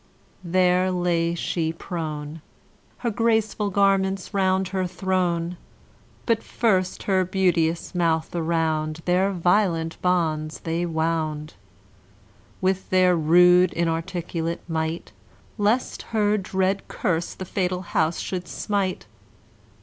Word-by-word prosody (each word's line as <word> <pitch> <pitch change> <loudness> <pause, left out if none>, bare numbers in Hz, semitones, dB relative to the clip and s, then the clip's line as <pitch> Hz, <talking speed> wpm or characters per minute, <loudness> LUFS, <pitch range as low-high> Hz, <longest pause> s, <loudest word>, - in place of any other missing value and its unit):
There 180 +1 +2
lay 170 -2 0
she 165 -1 -1
prone, 160 -3 -5 0.6
Her 235 - +2
graceful 220 -1 +1
garments 195 -1 +1
round 190 -1 +1
her 185 -1 -1
thrown; 180 -2 -1 0.7
But 230 -2 +2
first 185 -6 0
her 190 -2 +2
beauteous 175 -3 0
mouth 165 -2 0
around 160 -2 -1
Their 185 +2 +2
violent 175 -3 +1
bonds 160 -4 0
they 170 +1 -1
wound, 160 -2 -2 1.1
With 190 0 0
their 185 -1 +4
rude 180 +3 +5
inarticulate 165 0 -2
might, 160 0 -3 0.5
Lest 215 +5 +1 0.2
her 210 0 +3
dread 190 -1 -1
curse 170 -1 -2
the 190 - -6
fatal 180 -1 -2
house 165 -1 0
should 180 -2 -4
smite. 195 - -2
180 Hz, 105 wpm, -24 LUFS, 165-190 Hz, 1.1 s, rude